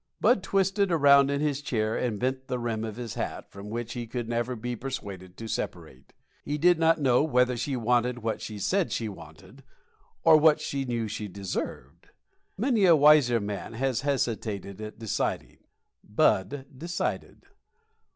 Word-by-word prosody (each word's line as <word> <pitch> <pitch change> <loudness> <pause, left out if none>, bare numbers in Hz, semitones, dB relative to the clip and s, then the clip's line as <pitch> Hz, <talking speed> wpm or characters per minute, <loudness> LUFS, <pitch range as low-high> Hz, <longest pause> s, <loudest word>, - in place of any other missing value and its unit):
Bud 220 -2 +4
twisted 195 0 +1
around 140 -3 +6
in 140 0 -1
his 145 -2 0
chair 110 -6 -1
and 115 -5 -2
bent 130 +1 -2
the 125 - -2
rim 115 -2 -2
of 110 -2 -5
his 120 -3 -6
hat, - - -5
from 100 +1 -9
which 120 +1 -4
he 120 -2 -5
could 120 0 -4
never 120 +2 -1
be 120 +2 -4
persuaded 100 -8 -7
to 115 - -7
separate. 65 -10 -6 0.3
He 145 - -2
did 175 +2 +4
not 165 0 +4
know 130 -4 +3
whether 125 -4 +2
she 130 +3 -2
wanted 125 0 0
what 110 -1 -2
she 110 -1 -6
said 185 - 0
she 115 - -2
wanted 95 - -12 0.6
or 160 -1 +7
what 155 0 +5
she 140 -1 -3
knew 120 -3 -2
she 105 0 -5
deserved. 90 -6 -6 0.5
Many 225 -2 +2
a 170 -3 +7
wiser 145 -5 +5
man 100 0 -5
has 130 +1 -1
hesitated 110 -7 -2
at 110 0 -7
deciding. 110 -3 -3 0.4
Bud 130 +8 +1
decided. 170 +6 -4
125 Hz, 165 wpm, -27 LUFS, 110-145 Hz, 0.6 s, or